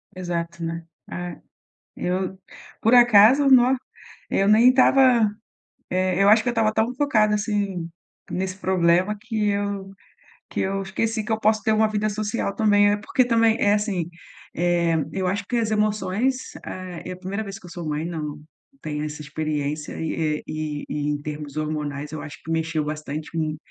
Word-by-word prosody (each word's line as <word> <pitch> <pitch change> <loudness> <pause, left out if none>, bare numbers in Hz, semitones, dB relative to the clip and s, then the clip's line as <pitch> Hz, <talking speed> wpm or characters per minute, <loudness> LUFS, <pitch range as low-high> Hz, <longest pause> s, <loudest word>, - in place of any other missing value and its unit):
Exato, 170 -2 -4
né, 165 0 -4 0.3
ah, 175 -2 -5 0.6
eu 185 +1 -2 0.4
por 225 - +3
acaso, 240 +3 +7
no 255 0 +6 0.5
eu 195 - +2
nem 220 +4 +7
estava, 255 -3 +5 0.6
eh, 185 0 +1
eu 200 - +5
acho 215 +2 +6
que - - -2
eu - - +3
estava 225 -2 +2
tão 225 +3 +1
focada 215 -7 +2
assim 205 -5 -2 0.4
nesse 185 0 -3
problema 185 +2 +2
que 215 -1 -1
eu 200 -1 -2 0.6
que - - -3
eu 195 +1 -1
esqueci 215 +3 -2
que 220 - -2
eu 220 - -1
posso 215 0 +2
ter 220 - +2
uma 215 0 +3
vida 215 0 -1
social 210 0 -2
também, 205 -2 +4
né. 205 - +2
Porque 250 +4 +1
também 230 -2 +3
é 205 - +4
assim, 200 -5 -1 0.5
eh, 170 -1 +1 0.2
eu 190 -1 -2
acho 200 +2 -1
que 245 - -1
as 225 -2 0
emoções. 215 +4 0
É 185 0 -6 0.2
é - - -3
a - - -7
1ª 190 +4 -4
vez 195 -1 -7
que - - -14
eu - - -12
sou 170 -3 -6
mãe, 150 +1 -2
não 150 -3 -5 0.4
tenho 150 -1 -3
essa 150 0 -6
experiência 150 0 -3
e 160 - -2 0.3
é - - -17
e 155 -1 -4
e 145 0 -2
em 145 -1 -2
termos 150 -1 -7
hormonais, 150 -1 -3
eu 155 - -5
acho 150 - -9
que 160 - -7
mexeu 160 -1 -1
bastante 150 0 -5
com 155 -2 -2
190 Hz, 180 wpm, -23 LUFS, 160-215 Hz, 0.6 s, acaso